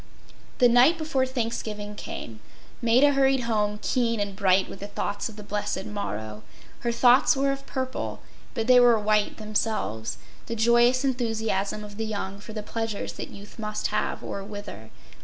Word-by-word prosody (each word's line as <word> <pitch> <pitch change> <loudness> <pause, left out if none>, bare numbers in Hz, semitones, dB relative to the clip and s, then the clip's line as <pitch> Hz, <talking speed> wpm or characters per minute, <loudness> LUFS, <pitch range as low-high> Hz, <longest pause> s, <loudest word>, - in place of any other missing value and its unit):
The 250 - +6
night 245 +8 +6
before 305 -5 0
Thanksgiving 225 -4 -3
came. 115 - -7 0.4
Maida 250 +5 +5
hurried 270 -1 +3
home, 210 -3 0
keen 230 -3 +1
and 205 -1 -2
bright 190 -1 +3
with - - -9
the 200 - -6
thoughts 205 +1 -3
of 220 - -11
the 210 - -9
blessed 205 -1 -3
morrow. 110 - -5 0.4
Her 235 - -1
thoughts 245 +4 +5
were 275 0 +2
of 275 0 -5
purple, 260 -1 -3 0.4
but 225 -3 -1
they 250 +1 +7
were 240 -2 +6
white 210 0 +1
themselves—the 215 - -3
joyous 240 +3 +4
enthusiasm 225 -5 -1
of 205 -1 -10
the 225 - -2
young 200 -2 -4
for 210 +2 -10
the 215 -1 -4
pleasures 225 -1 -3
that - - -6
youth 205 +3 -12
must 215 -1 -2
have - - -1
or 200 - -5
wither. 205 - -8
220 Hz, 165 wpm, -26 LUFS, 205-245 Hz, 0.4 s, they